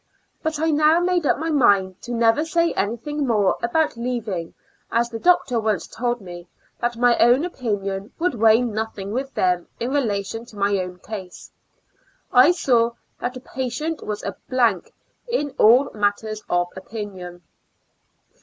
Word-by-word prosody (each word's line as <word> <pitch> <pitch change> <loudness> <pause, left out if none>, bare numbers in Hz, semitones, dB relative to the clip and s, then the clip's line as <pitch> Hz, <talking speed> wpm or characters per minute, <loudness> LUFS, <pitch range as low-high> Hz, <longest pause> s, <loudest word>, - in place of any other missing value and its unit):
But 315 -1 -2
I 320 +1 +2
now 305 +2 +4
made 350 -3 +1
up - - +3
my 320 +2 -2
mind 200 -10 +3
to 245 - -8
never 230 +4 +3
say 335 +1 +1
any 215 +4 -1
thing 295 +3 -3
more 210 -5 +2
about 305 +6 +1
leaving, 230 -8 -3 0.4
as 235 +1 +1
the 225 - -5
doctor 275 -8 +3
once 215 -5 -1
told 240 0 -3
me 175 -2 -10 0.3
that 240 0 -1
my 245 0 +4
own 245 +7 +5
opinion 205 - -3
would 355 -2 0
weigh 225 0 +5
nothing 215 -3 -4
with 265 +4 -3
them 180 -1 +1
in 240 +3 -2
relation 225 -5 -1
to 215 - -15
my 200 0 +2
own 180 -1 -5
case. 190 -2 -9 0.8
I 255 +5 +7
saw 235 -9 +2 0.3
that 250 +1 -3
a - - -10
patient 285 +5 -4
was 210 -1 -4
a - - -4
blank 235 -8 +1 0.4
in 295 - -1
all 245 +6 +6
matters 210 +1 -1
of 175 0 +1
opinion. 185 -3 -8
235 Hz, 160 wpm, -22 LUFS, 205-270 Hz, 0.8 s, I